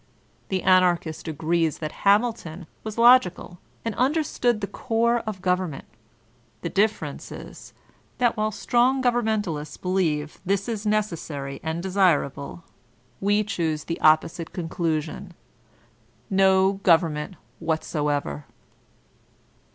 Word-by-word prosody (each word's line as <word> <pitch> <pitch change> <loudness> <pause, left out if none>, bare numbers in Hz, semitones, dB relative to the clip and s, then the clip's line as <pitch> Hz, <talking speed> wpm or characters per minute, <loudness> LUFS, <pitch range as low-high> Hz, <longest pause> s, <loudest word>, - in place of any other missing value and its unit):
The 190 -1 -1
Anarchist 175 -4 +2
agrees 160 +1 0
that 155 -1 -5 0.2
Hamilton 200 -6 +1 0.2
was 215 -1 -5
k^cal, 235 -7 +4 0.3
and 225 - -1
understood 255 -3 +1
the 200 - -2
core 235 +3 0
of 190 -4 -5
government; 180 -5 -1 0.8
the 170 - -2
difference 210 +3 -1
is, - - -10 0.4
that 240 -2 +2
while 215 0 0
strong 245 +5 +1
govemmentalists 215 - -1
believe 165 -6 -1
this 195 +1 0
is 215 -2 -3
necessary 165 -10 -2
and 160 +2 -3
desirable, 170 -6 0 0.6
we 205 +2 +2
choose 165 -7 -2
the 165 - -5
opposite 160 +1 +3
conclusion, 165 +1 -3 1.0
no 190 0 +4
government 165 -2 +2 0.2
whatever. 145 - -2
185 Hz, 105 wpm, -24 LUFS, 160-215 Hz, 1.0 s, k^cal